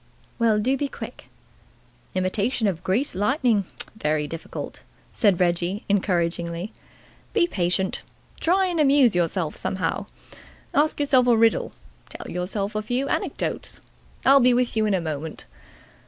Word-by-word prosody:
"Well, 225 -2 +3
do 250 +6 +1
be 285 - -1
quick." - - -9 0.9
"Imitation 200 +6 0
of 180 -4 -1
greased 225 +10 0
lightning 215 - +1 0.3
very 150 -7 0
difficult," 165 +2 -7 0.3
said 200 -5 +3
Reggie 175 +3 0
encouragingly. 175 -1 0 0.6
"Be 400 -6 +4
patient. 190 - -1 0.4
Try 375 +3 +3
and 350 -3 -1
amuse 275 -5 +5
yourself 170 -2 0
somehow. 190 -1 -2 0.7
Ask 300 +1 +2
yourself 265 -4 +4
a 235 -2 +5
riddle. 225 0 +3 0.4
Tell - - -8
yourself 195 +3 -2
a 215 - -1
few 245 +5 -1
anecdotes. - - -3 0.5
I'll 275 +1 +8
be 250 -1 +5
with 245 -1 +1
you 215 -1 +2
in 205 - +2
a 180 - 0
moment. 155 -1 -5
210 Hz, 135 wpm, -24 LUFS, 180-250 Hz, 0.9 s, I'll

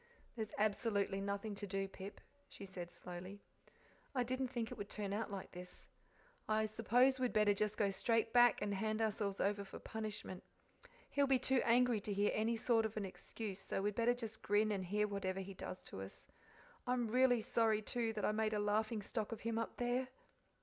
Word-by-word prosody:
"There's 220 -3 -3
absolutely 205 -2 +1
nothing 200 +2 -2
to 205 0 -5
do, 195 0 -1
Pip," 195 +1 -9 0.3
she 200 - -9
said 180 -2 -7
slowly. 185 +3 -7 0.8
"I 250 - +3
didn't 255 +2 -1
think 235 -2 -3
it - - -6
would 205 0 -5
turn 200 -2 -3
out 220 +2 -1
like 195 -2 -6
this. 180 0 -9 0.6
I 215 0 +3
suppose 240 +5 +3
we'd 250 -1 +1
better 210 -1 +5
just 210 +1 -1
go 200 -2 +2
straight 225 +3 +1
back 245 -2 +6
and 205 -1 0
hand 215 +2 0
ourselves 210 -3 0
over 200 0 +1
for 195 - -9
punishment. 215 -4 -5 0.7
He'll 280 -1 +3
be 270 -1 +5
too 260 0 +2
angry 240 -1 +4
to 205 - -3
hear 205 +1 +2
any 225 +2 +1
sort 225 0 +3
of 215 - -11
an 205 - -1
excuse, 195 +1 -6
so 195 - -2
we'd 205 +1 +1
better 235 +3 +3
just 225 -3 -6
grin 210 +1 +3
and 195 -2 -1
hear 210 +3 +1
whatever 195 -2 -2
he 195 +1 -5
does 185 0 -7
to 95 - -7
us. 95 - -8 0.6
I'm 245 -1 +1
really 245 +1 +4
sorry, 225 -3 +2
too, 230 0 0
that 210 -2 -1
I - - +3
made 215 0 +1
a - - +1
laughing 215 +1 +1
stock 215 +1 -3
of 225 - -5
him 230 0 -1
up 230 - -3
there." 245 +1 0
215 Hz, 200 wpm, -38 LUFS, 200-230 Hz, 0.8 s, back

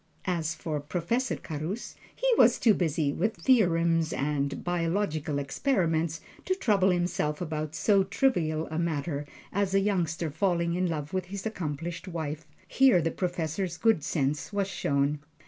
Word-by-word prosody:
As 165 -3 -1
for 155 -3 -3
Professor 180 - -1
Carus, 160 +9 -5 0.2
he - - -1
was - - +6
too 225 - +5
busy 155 -5 0
with 220 +7 0
his 165 - -16
theorems 165 -9 +3
and 140 0 -1
biological 165 -3 -1
experiments 160 - 0 0.2
to 370 - +1
trouble 205 - +3
himself 175 -4 0
about 155 -2 -3
so 195 +3 +3
trivial 175 -7 +1
a 160 - -1
matter 150 -3 -2 0.3
as 195 -1 +1
a - - +6
youngster 170 -5 0
falling 170 +1 +1
in 180 +1 +1
love 155 0 -4
with 185 -1 -1
his 195 +2 -7
accomplished 170 -3 -4
wife 155 -3 -4 0.2
here 260 -8 +5
the 165 0 0
Professor's 175 0 -2
good 225 -10 +3
sense 145 +1 -1
was 200 -2 0
shown. 140 -5 0
170 Hz, 150 wpm, -28 LUFS, 155-195 Hz, 0.3 s, was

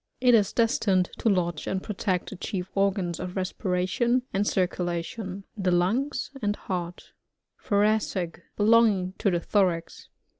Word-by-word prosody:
It 250 -1 +5
is 210 -4 +4
destined 200 -5 +2
to 225 - +2
lodge 175 -5 0
and 190 0 -2
protect 190 -3 -2
the - - -6
chief 185 0 -4
organs 195 -3 0
of 180 0 -5
respiration 190 +6 0
and 200 +2 +1
cir 185 -2 +2
culation: 180 +3 -4
— - - -53
the 190 -4 0
lungs 205 +15 0
and 205 -1 0
heart 180 -3 -5 0.5
Thoracic— 205 -5 0 0.2
Belonging 210 -4 +4
to 200 - +2
the 175 -2 +1
thorax. 175 -2 0
190 Hz, 145 wpm, -26 LUFS, 180-210 Hz, 0.5 s, It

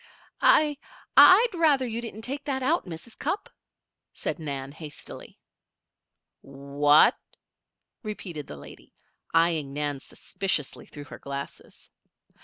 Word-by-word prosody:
"I 300 -2 +4 0.4
I'd 455 +6 +8
rather 305 -6 +3
you 235 -1 -4
didn't 225 -2 -8
take 275 +4 -5
that 265 -2 -2
out, 310 - +1
Mrs. 175 +7 -9
Cupp," 400 0 -3 0.6
said - - -4
Nan, 140 -3 -5
hastily. 150 -1 -10 1.0
"What?" 140 +2 +3 0.9
repeated 185 - -7
the 75 - -9
lady, 70 - -14 0.4
eyeing 165 -4 +2
Nan 145 -1 -2
suspiciously 150 +1 -3
through 145 - -10
her - - -11
glasses. 140 0 -9
165 Hz, 110 wpm, -26 LUFS, -, 1.0 s, I'd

